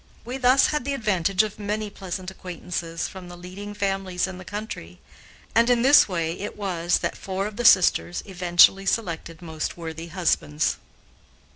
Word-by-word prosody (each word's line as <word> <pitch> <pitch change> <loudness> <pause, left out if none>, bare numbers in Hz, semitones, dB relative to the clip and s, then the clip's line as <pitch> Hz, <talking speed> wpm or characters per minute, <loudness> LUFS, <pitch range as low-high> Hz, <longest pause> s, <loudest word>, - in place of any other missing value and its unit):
We 250 +3 -4
thus 255 +1 +5
had 300 - 0
the 280 +2 -2
advantage 195 -4 +1
of 215 0 -6
many 210 0 -3
pleasant 185 -1 -6
acquaintances 175 -2 -5
from 185 -2 -10
the 175 - -10
leading 195 +4 -8
families 195 -3 -1
in 190 -1 -7
the - - -9
country, 180 - -7 0.5
and, 230 +2 +4
in 240 -1 +3
this 275 -4 +7
way, 170 -2 -2
it 205 - -6
was 175 -4 0
that - - -2
four 195 0 -3
of 210 0 -5
the 240 +2 -3
sisters 180 -3 +4
eventually 185 +1 +4
selected 170 -5 -2
most 160 -1 -4
worthy 165 0 -6
husbands. 155 - 0
190 Hz, 165 wpm, -24 LUFS, 175-210 Hz, 0.5 s, this